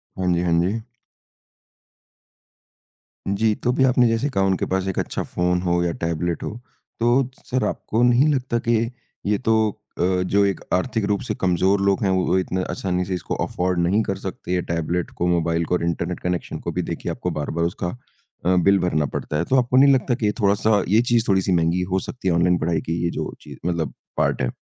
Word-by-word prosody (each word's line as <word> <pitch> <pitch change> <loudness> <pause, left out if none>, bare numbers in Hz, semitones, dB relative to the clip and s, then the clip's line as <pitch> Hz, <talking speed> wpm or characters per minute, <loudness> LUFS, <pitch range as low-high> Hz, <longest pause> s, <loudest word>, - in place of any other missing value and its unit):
हाँ 90 -1 0
जी, 85 - +1
हाँ 90 -1 0
जी। 100 +6 -1 2.5
जी, 110 +1 +2
तो 125 - 0
अभी 135 +1 +2
आपने 125 -2 +4
जैसे 115 +5 0
कहा 100 -8 0
उनके 95 -1 +1
पास 95 0 -1
एक 95 - -3
अच्छा - - -2
फ़ोन 90 0 0
हो 85 -1 +1
या 85 - 0
टैबलेट 85 +1 -1
हो। - - -2 0.5
तो 120 +2 +3 0.2
सर 130 -1 -1
आपको 110 +2 -2
नहीं 125 +4 +5
लगता 125 -3 -1
कि 120 - +4 0.5
ये 105 0 +2
तो - - +5 0.5
अ, - - +2 0.2
जो 100 +2 +2
एक 100 -1 0
आर्थिक 110 +3 0
रूप 100 - 0
से - - 0
कमज़ोर 95 +2 +2
लोग 100 0 +2
हैं 100 - +2
वो 95 0 +2
इतने 95 0 -1
आसानी 90 -1 -1
से 95 - -3
इसको 90 - -3
अफ़ोर्ड 90 0 -1
नहीं 100 +5 +2
कर 95 - -2
सकते 95 -1 -5
ये 90 - +1
टैबलेट 85 +1 -1
को 90 - 0
मोबाइल 85 -1 +1
को 90 - 0
और 90 - -2
इंटरनेट 85 -1 -2
कनेक्शन 90 -1 -3
को - - -1
भी - - -1
देखिए - - -3
आपको - - -3
बार-बार 85 +3 -1
उसका 85 +1 -2 0.6
अ, 90 +1 +4
बिल 95 +2 +4
भरना 75 -5 +1
पड़ता 75 - -2
है 85 - 0
तो 130 - +1
आपको 125 +1 +1
नहीं 140 +1 +7
लगता 130 -1 +1
कि 115 - -2
ये 105 - +3
थोड़ा-सा 100 0 +3
ये 110 +4 +5
चीज़ 115 -1 +3
थोड़ी-सी 95 -1 +2
महँगी 85 +1 +2
हो 95 - +2
सकती 125 -7 -5
है 90 - +3
ऑनलाइन 90 +1 +3
पढ़ाई 80 -1 0
की 85 +1 -3
ये 85 - +1
जो - - -4
चीज़ - - -11
मतलब 80 -7 -2 0.2
पार्ट - - +1
है? 65 - 0
95 Hz, 210 wpm, -22 LUFS, 85-110 Hz, 2.5 s, नहीं